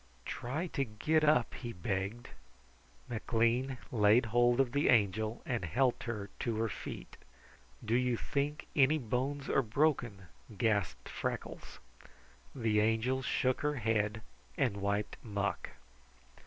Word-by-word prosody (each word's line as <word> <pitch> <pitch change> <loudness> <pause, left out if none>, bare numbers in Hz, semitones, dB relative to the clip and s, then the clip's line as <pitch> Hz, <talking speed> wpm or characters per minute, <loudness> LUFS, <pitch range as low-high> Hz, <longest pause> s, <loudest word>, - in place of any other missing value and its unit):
"Try 140 +8 -3
to 135 - +1
get 145 +7 +1
up," 150 -6 +3
he 120 -2 -6
begged. 95 +5 -3 0.8
McLean 120 +3 0
laid 110 +1 +5
hold 120 +2 +3
of 130 -3 +3
the 145 +2 +2
Angel 110 0 +2
and 120 -6 -1
helped 120 +10 +1
her 105 -4 -4
to 115 -3 -1
her 115 0 0
feet. - - -7 0.7
"Do 110 - 0
you 125 -1 +2
think 145 +4 -2
any 145 +2 +5
bones 135 +2 -2
are - - +3
broken?" 120 -5 0 0.3
gasped 105 -6 0
Freckles. - - -5 0.8
The 110 -5 +2
Angel 115 +5 +1
shook 130 0 0
her 150 0 0
head 110 -2 0 0.3
and 120 -7 +1
wiped 100 +1 -1
muck. 100 -5 -2
120 Hz, 130 wpm, -33 LUFS, 105-130 Hz, 0.8 s, laid